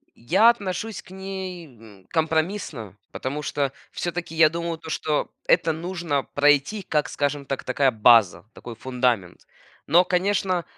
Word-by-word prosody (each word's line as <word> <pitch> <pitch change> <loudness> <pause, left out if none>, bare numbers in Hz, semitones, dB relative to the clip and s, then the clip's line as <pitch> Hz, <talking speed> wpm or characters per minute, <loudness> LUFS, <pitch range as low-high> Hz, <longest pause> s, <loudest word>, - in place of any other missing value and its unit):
Я 210 - +4
отношусь 215 -1 -4
к - - -18
ней, 190 -2 -6
м, 110 -7 -17
компромиссно, 160 - -2 0.2
потому 140 +3 -4
что 140 -2 -1 0.2
всё-таки 175 -1 -4
я 160 -1 +6
думаю, 170 +1 -4
то 160 0 -10
что 155 -1 -1 0.2
это 165 - +3
нужно 165 -4 -2
пройти 145 +8 +3
как, 150 -1 +1
скажем 145 0 -2
так, 135 - -4
такая 135 +1 +2
база, 110 -7 +4
такой 120 - -9
фундамент. 120 -6 -1 0.5
Но, 170 +5 +5
конечно, 185 -1 0
155 Hz, 140 wpm, -24 LUFS, 130-180 Hz, 0.5 s, я